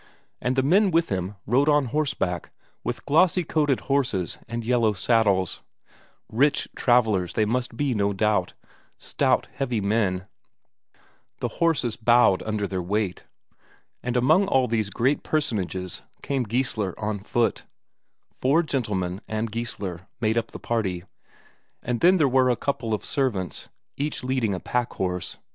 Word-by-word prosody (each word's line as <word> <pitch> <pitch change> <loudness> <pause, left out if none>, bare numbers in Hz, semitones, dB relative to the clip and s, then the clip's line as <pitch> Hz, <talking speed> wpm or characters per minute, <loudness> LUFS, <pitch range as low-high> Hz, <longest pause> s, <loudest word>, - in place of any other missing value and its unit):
And 125 +2 0
the 130 - +2
men 190 +8 +4
with 165 -1 +2
him 95 +1 -2
rode 135 +7 +3
on 145 -2 +4
horseback 135 - -1 0.3
with - - -4
glossy 180 +4 +3
coated 150 -4 +1
horses 125 - 0
and 115 0 -4
yellow 115 -3 +2
saddles; 100 -3 +2 0.7
rich 140 +6 +2
travellers 110 -8 +2
they 110 - +2
must 120 +1 -2
be 145 -3 +1
no 100 -2 +1
doubt; 100 -2 0 0.4
stout, - - +1
heavy 125 -5 -1
men; 100 -3 0 1.1
the - - -2
horses 155 -9 +1
bowed 120 -4 +4
under 105 -2 -2
their 95 -2 -3
weight. 100 +1 -2 0.8
And 125 0 -1
among 155 +11 +4
all 130 -8 +3
these 110 -3 0
great 130 +8 +1
personages 95 - -2 0.2
came 135 -3 -1
Geissler 110 -4 -1
on 105 -1 -2
foot. 115 +3 0 0.7
Four 145 +6 +3
gentlemen 105 - -2
and 110 +2 -2
Geissler 100 -5 -5
made 110 0 +1
up 115 - 0
the - - -8
party, 95 -7 -2 0.8
and 120 -1 -1
then 180 +2 +5
there 155 -5 +4
were 130 0 +3
a 125 - +3
couple 115 -4 -1
of - - -8
servants 110 -10 -2 0.3
each 145 -1 -3
leading 125 -6 0
a - - -4
packhorse. 95 -8 -2
115 Hz, 145 wpm, -25 LUFS, 100-135 Hz, 1.1 s, then